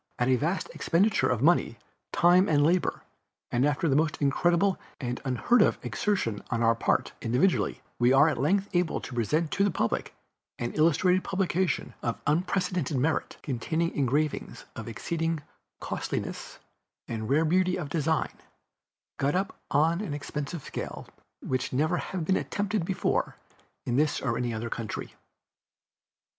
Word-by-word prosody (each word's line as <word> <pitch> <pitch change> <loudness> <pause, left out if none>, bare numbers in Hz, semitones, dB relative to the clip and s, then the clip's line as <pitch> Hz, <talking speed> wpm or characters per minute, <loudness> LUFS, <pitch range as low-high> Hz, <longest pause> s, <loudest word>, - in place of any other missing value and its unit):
At 125 +1 +1
a 130 - +5
vast 165 +9 -1
expenditure 195 +5 +2
of 125 -1 0
money, 165 -7 +3 0.3
time 180 +3 +5
and 145 -2 +4
labor, 175 +3 +1 0.5
and 120 +1 +2
after 145 +3 +1
the 135 - +2
most 155 +1 +2
incredible 175 +7 +2 0.2
and 125 -3 -3
unheard 140 - +3
of - - +3
exertion 150 - -1
on 115 -1 0
our 115 0 +5
part, 115 - 0
individually, 125 +11 +1 0.2
we 120 +1 +4
are 135 +3 +6
at 155 -7 0
length 190 +9 +2
able 175 -2 +1
to 130 - -8
present 150 +8 0
to 200 - +2
the 205 - +3
public 115 - -2 0.4
an 120 0 -3
illustrated 175 +4 +3
publication 185 -4 -1
of 120 -1 -2
unprecedented 175 -2 0
merit, 145 +4 0
containing 160 +5 -1
engravings 145 +3 -1
of - - -7
exceeding 165 -2 -2 0.4
costliness - - -4 0.5
and 110 -2 -4
rare 155 +4 +3
beauty 180 +3 +2
of 165 -5 -4
design, 160 0 0 0.9
got 140 +3 +1
up 195 +3 -1
on 160 +5 +2
an 170 -9 -3
expensive 145 +1 -5
scale - - -6 0.4
which 130 0 -2
never 155 +7 +1
has 185 0 -4
been 190 +4 +2
attempted 205 -3 -1
before 185 +1 0 0.5
in 120 - 0
this 150 0 +2
or 115 -4 -1
any 120 0 -1
other 115 +1 -3
country. 115 -3 -5
155 Hz, 150 wpm, -28 LUFS, 130-180 Hz, 0.9 s, are